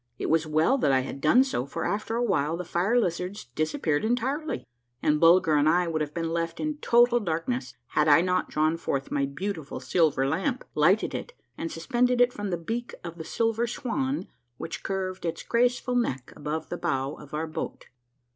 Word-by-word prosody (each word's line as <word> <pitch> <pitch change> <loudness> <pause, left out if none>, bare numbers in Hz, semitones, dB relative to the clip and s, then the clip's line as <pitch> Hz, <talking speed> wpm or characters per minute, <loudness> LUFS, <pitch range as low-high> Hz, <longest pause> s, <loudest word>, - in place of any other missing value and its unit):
It - - -2
was 160 -1 +2
well 155 - +3
that 145 - +3
I 130 -1 +4
had 135 +1 -6
done 195 - +6
so, 140 - -2
for - - -4
after 210 +4 -2
a 240 - +1
while 165 -7 +1
the 180 - -5
fire 190 +9 +2
lizards 180 - -2
dis 155 - -1
appeared 155 - 0
entirely, 260 +7 -1 0.3
and 150 +2 +2
Bulger 165 -1 +5
and 145 0 +3
1 170 +1 +3
would 155 -1 -1
have 150 -1 -2
been 165 -1 -2
left 165 0 -2
in 305 -1 -2
total 240 -3 +4
darkness, 160 - -2
had 150 0 +2
I 150 +2 +7
not 180 +1 0
drawn 155 +2 +1
forth 135 -4 -3
my 140 -1 +1
beautiful 160 +1 -5
silver 155 -6 +2
lamp, 195 - -1
lighted 175 +8 +3
it, - - -5 0.2
and 165 - -4
suspended 245 +9 +1
it 245 0 +4
from 205 -1 -4
the 175 - -1
beak 230 +9 -4
of 170 0 -8
the - - -4
silver 225 +6 0
swan 265 +4 -2 0.3
which 165 - -6
curved 190 -1 -3
its 165 -2 -3
graceful 245 +1 +1
neck 135 - -1
above 155 +2 -4
the 175 - -3
bow 135 -4 -1
of 150 0 -9
our 155 +1 -1
boat. 155 - -6
170 Hz, 200 wpm, -27 LUFS, 155-235 Hz, 0.3 s, I